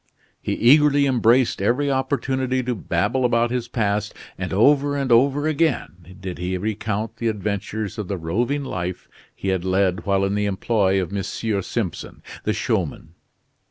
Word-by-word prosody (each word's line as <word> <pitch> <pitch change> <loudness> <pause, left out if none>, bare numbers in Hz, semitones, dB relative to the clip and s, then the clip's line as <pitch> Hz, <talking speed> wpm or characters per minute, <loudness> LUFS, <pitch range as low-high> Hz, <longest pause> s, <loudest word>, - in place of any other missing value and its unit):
He - - -2
eagerly 145 +3 +5
embraced 125 -3 +3
every 135 +7 +1
opportunity 130 -1 0
to 125 0 -1
babble 100 +5 -1
about 120 -1 +2
his 125 -1 -2
past, 105 -3 -1 0.2
and 95 -1 -5
over 145 +7 +3
and 135 -3 -1
over 140 +5 +4
again 120 - -1
did 95 -2 -6
he 90 +1 -2
recount 110 +2 -3
the 115 - -2
adventures 105 0 -3
of 105 - -4
the 100 - -3
roving 120 - -1
life 90 -7 -4 0.3
he 95 - -3
had 95 -2 0
led 95 -1 +1
while 100 0 +2
in 100 - -1
the 105 0 0
employ 95 -1 +1
of 95 +1 -3
M. 100 - 0
Simpson, 100 -2 -3 0.2
the - - +2
showman. 80 - -2
110 Hz, 160 wpm, -22 LUFS, 95-130 Hz, 0.3 s, eagerly